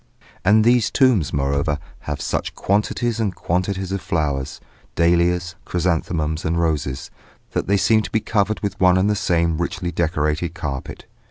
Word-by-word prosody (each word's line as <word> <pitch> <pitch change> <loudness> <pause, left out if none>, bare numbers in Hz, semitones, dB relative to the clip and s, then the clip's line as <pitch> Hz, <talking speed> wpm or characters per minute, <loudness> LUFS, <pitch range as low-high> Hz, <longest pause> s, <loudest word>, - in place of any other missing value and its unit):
And 105 +3 +5
these 120 0 +4
tombs, 125 - +3
moreover, 70 +2 0 0.3
have 75 -1 -2
such - - -2
quantities 105 +3 0
and 100 -5 -1
quantities 95 +2 -2
of 100 -1 -2
flowers, 70 -5 -2 0.4
dahlias, 85 +1 +2
chrysanthemums 80 -2 -1
and 85 +1 0
roses, 75 -5 -1 0.4
that - - -2
they 100 +1 +3
seem 110 +3 +3
to 105 - -6
be 110 - +2
covered 110 0 0
with 100 -1 -3
one 90 -1 +5
and 100 +3 +2
the - - +1
same 85 -4 +1
richly 85 0 -2
decorated 80 0 -1
carpet. 75 -6 -5
85 Hz, 155 wpm, -21 LUFS, 80-100 Hz, 0.4 s, And